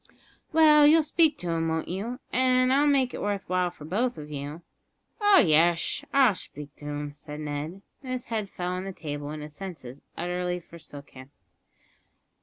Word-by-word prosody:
"Well, 300 -2 +7
you'll 320 +1 +6
speak 310 0 +3
to 175 - -5
him, 165 0 0
won't 160 0 -2
you, 210 +8 -4 0.2
and 255 0 +3
I'll 285 +2 +4
make 270 -3 +2
it - - -5
worth 205 -1 -2
while 180 0 +1
for 155 -4 -13
both 235 +10 -1
of 150 0 -9
you?" 145 +3 -6 0.6
"Oh 410 -1 +6
yesh, 165 - +3
I'll 265 -6 +5
shpeak 150 -5 -9
to 145 - -11
him," 145 0 -4
said 150 +1 -9
Ned, 150 +5 -5 0.2
as 255 -1 -3
his - - -19
head 215 -3 -2
fell 180 -1 -4
on 185 +1 -3
the 195 - -5
table 145 -3 -6
and 150 0 -6
his 150 0 -9
senses 150 -8 -9 0.2
utterly 180 +1 -2
forsook 155 -4 -12
him. 130 0 -12
180 Hz, 185 wpm, -27 LUFS, 150-250 Hz, 0.6 s, Well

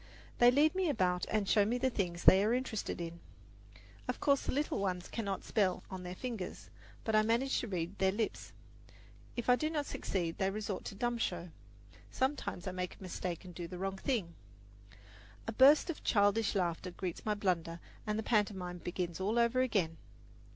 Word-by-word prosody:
They 240 - +8
lead 290 +5 +4
me 375 -3 +1
about 180 -9 +1
and 215 -2 0
show 205 0 +5
me 230 +4 0
the 260 +1 +1
things 175 -6 -2
they 190 +1 +8
are 220 +3 +3
interested 250 -7 -3
in. 170 0 -5 0.9
Of - - -2
course 280 -1 +3
the - - +1
little 290 -3 0
ones 180 -2 -2
cannot 200 -5 -3
spell 190 -4 +1
on 190 -1 -5
their 180 0 -6
fingers; 225 -5 -6 0.3
but 220 - 0
I 215 - +6
manage 235 +5 +1
to 245 - -4
read 180 -1 -3
their 190 0 +4
lips. 215 +2 -3 0.8
If 240 - -3
I 250 - +7
do 310 +4 -1
not 300 -2 -1
succeed 170 -10 -3
they 190 - +2
resort 205 -1 -4
to - - -6
dumb 240 +2 -1
show. 175 -5 -2 0.6
Sometimes 260 -9 -2
I 185 - -2
make 180 0 -4
a - - -12
mistake 180 -1 -4
and 180 - -9
do 170 0 -5
the 180 - -7
wrong 195 +1 -3
thing. 205 -11 -1 1.1
A - - -2
burst 270 +6 +6
of 315 - -10
childish 205 0 +3
laughter 180 -1 0
greets 180 -1 -5
my 210 -1 0
blunder, 175 -4 -1 0.3
and 210 0 0
the 220 - -2
pantomime 190 -5 0
begins 175 -1 -3
all 210 +5 0
over 235 +2 +3
again. 195 -10 +1
200 Hz, 190 wpm, -34 LUFS, 180-235 Hz, 1.1 s, They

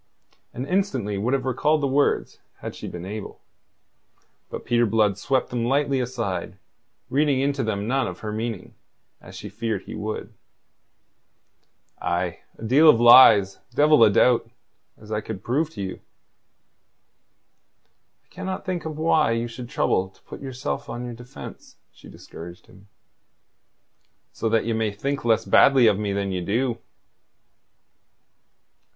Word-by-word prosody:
And 125 - -5
instantly 135 - -1
would 120 +6 +1
have 130 -1 -3
recalled 150 +4 +1
the - - +1
words 140 +2 0 0.2
had - - -7
she - - -8
been 90 0 -7
able. 105 +1 -7 1.1
But - - -7
Peter 120 -1 +2
Blood 105 -2 +2
swept 130 +6 -1
them 120 -1 -2
lightly 140 +2 +1
aside, 115 -8 -4 0.5
reading 140 -1 +2
into 140 0 0
them 105 -2 -2
none 135 +2 0
of 90 0 -8
her 105 - -4
meaning, 110 -3 -5 0.5
as - - -13
she - - -8
feared 110 -4 -4
he - - -9
would. 110 0 -5 1.7
"Aye 85 0 -2 0.2
a - - -11
deal 140 +8 +5
of 115 - +6
lies, 110 -5 +7 0.2
devil 150 -3 +5
a 110 - +7
doubt, 115 +2 +3 0.5
as 110 0 -14
I 105 0 -1
could 105 -2 -7
prove 150 +6 0
to 100 - -4
you." 95 - -6 2.2
"I - - -41
cannot 190 0 -5
think 185 -2 -2
why 155 -4 +1
you 115 +1 -2
should 120 +1 -9
trouble 95 -8 0
to 95 - -28
put - - -11
yourself 135 +1 -5
on 120 +1 -5
your 120 - -6
defence," 120 +3 -11 0.2
she - - -16
discouraged 85 +2 -11
him. 100 +1 -19 1.4
"So 115 - -2
that 115 0 +1
ye 115 - -1
may 110 -1 0
think 140 +7 -3
less 115 -1 +2
badly 135 -3 +5
of 105 -3 +3
me 105 -1 -2
than 100 0 -2
you 90 -1 -2
do." 115 +6 -1
115 Hz, 150 wpm, -24 LUFS, 105-135 Hz, 2.2 s, lies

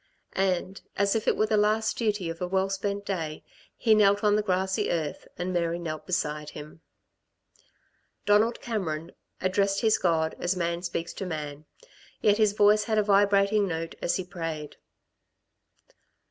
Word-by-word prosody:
And, 190 0 -1 0.2
as 200 +1 +2
if 220 - -1
it - - +3
were 215 - +3
the 215 0 +1
last 215 +1 +2
duty 210 -6 -1
of 165 - -10
a 180 - -1
well 190 +1 0
spent 200 +1 -2
day, 160 -6 -4 0.3
he 225 -2 +4
knelt 205 -1 +4
on 210 -1 +4
the 210 - +2
grassy 190 -1 0
earth, 155 -4 -3
and 180 +1 -3
Mary 170 -1 0
knelt 155 -3 -6
beside 150 -4 -2
him. 150 +2 -10 1.4
Donald 215 +3 +3
Cameron 170 -8 -3 0.3
addressed 195 +1 +1
his 220 -2 +3
God 160 -2 +1
as 175 +2 0
man 170 -1 -1
speaks 170 -1 -4
to 195 - -5
man; 150 -2 -5 0.5
yet 210 0 +3
his 215 -2 +4
voice 210 0 +4
had 220 0 0
a 215 - +4
vibrating 200 0 +3
note 165 -1 -4
as - - +1
he 185 - -2
prayed. 165 -4 -6
190 Hz, 160 wpm, -27 LUFS, 165-205 Hz, 1.4 s, he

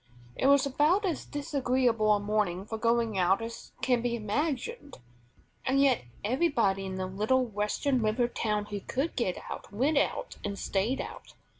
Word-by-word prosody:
It 265 - +1
was 280 -1 +5
about 300 +9 +2
as 345 -5 -2
disagreeable 255 -6 +1
a 210 - +4
morning 205 -3 0
for 220 +1 -5
going 230 -3 +1
out 185 +2 +3
as 230 0 -7
can 250 -2 +3
be 240 0 0
imagined; 285 - -3 0.7
and 265 +1 +2
yet 270 - +3 0.2
everybody 225 - +1
in 190 - -4
the 185 0 -2
little 215 +8 +1
Western 230 +5 0
river 220 +3 +2
town 210 -3 -1
who 205 -1 -5
could 270 - -2
get 190 -8 0
out - - -7
went 275 +8 +2
out - - -2
and 200 -1 -3
stayed 205 +8 0
out. - - -9
235 Hz, 165 wpm, -29 LUFS, 205-275 Hz, 0.7 s, was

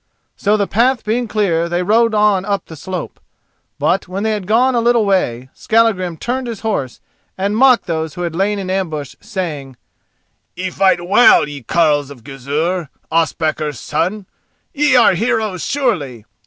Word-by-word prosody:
So 210 +1 +1
the 200 - +1
path 240 +5 +1
being 235 +3 -1
clear 175 -6 0
they 175 +1 -1
rode 225 +3 +2
on 210 -3 +3
up 200 0 -2
the 160 - -11
slope. 180 +3 -6 0.6
But 190 +1 0
when 190 +3 -4
they 220 - +1
had 205 -4 -3
gone 245 +5 +3
a 235 - +1
little 235 -2 +3
way, 130 -11 0
Skallagrim 205 -7 +1
turned 250 - -3
his 230 -3 -6
horse, 145 - -3 0.4
and 200 +2 -1
mocked 255 +1 +4
those 160 -2 -3
who 180 - -6
had 170 -2 -3
lain 200 +3 0
in 190 -2 -4
ambush, 160 -7 -3
saying: 155 - -5 0.8
"Ye 185 0 -4
fight 190 -2 +1
well, 200 -5 +5
ye 145 -1 -8
carles 145 +2 +1
of 130 -5 -13
Gizur, 145 +5 -3 0.2
Ospakar's 155 -4 -1
son! 195 +4 -2 0.5
Ye 295 -3 +2
are 240 -5 +6
heroes, 215 -3 -1
surely! 150 - -2
190 Hz, 165 wpm, -17 LUFS, 160-220 Hz, 0.8 s, are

